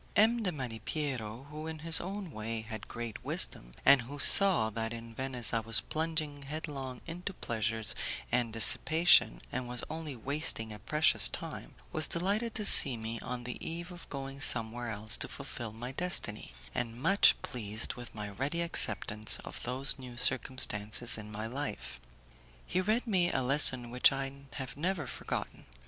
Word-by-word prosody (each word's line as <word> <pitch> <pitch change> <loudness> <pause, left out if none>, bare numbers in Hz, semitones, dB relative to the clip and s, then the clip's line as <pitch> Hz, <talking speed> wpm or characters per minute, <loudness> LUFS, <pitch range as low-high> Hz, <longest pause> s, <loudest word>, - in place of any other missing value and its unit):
M. 225 +3 +3
de 190 -4 -1
Malipiero, 125 -2 -6
who 155 +1 -8
in 160 0 -7
his 165 -1 +6
own 190 -1 -7
way 110 -1 -5
had 110 -1 -9
great 120 -2 -8
wisdom, - - -3
and 140 -1 +6
who 135 +5 -10
saw 165 - +6
that 115 +1 -5
in 115 0 -10
Venice 125 -2 -1
I 115 - +1
was 115 0 +2
plunging 155 -2 -4
headlong 140 -3 -7
into 180 +3 -7
pleasures 110 -3 -3 0.4
and 120 -2 0
dissipation, 120 +3 +5
and 130 0 -5
was 125 0 -4
only 155 -3 -7
wasting 125 -3 0
a 105 - -11
precious 150 +9 +3
time, - - -8 0.2
was 155 - 0
delighted 205 +7 -3
to 215 -3 +1
see 135 -10 +9
me 115 +1 -6
on 125 -1 -7
the 125 0 -8
eve 170 +2 -7
of 175 -1 -12
going 135 0 -7
somewhere 120 0 0
else 110 0 +1
to - - -2
fulfil 115 -2 -8
my 120 +4 -8
destiny, 135 - -1 0.2
and 115 0 -4
much 195 +9 +3
pleased 110 -3 -4
with 120 -2 -11
my 105 -1 -6
ready 135 +11 -4
acceptance 110 - +1
of - - -9
those 130 +3 -2
new 125 -2 -11
circumstances 120 -3 +5
in 105 -1 -8
my 110 +1 -6
life. 110 - -6 0.6
He 185 - -2
read 215 +6 -1
me 185 -6 0
a 130 - -1
lesson 125 -2 +5
which 125 +1 +4
I 135 0 -4 0.2
have 130 -1 -7
never 170 +1 -3
forgotten. - - -7
130 Hz, 165 wpm, -30 LUFS, 115-155 Hz, 0.6 s, see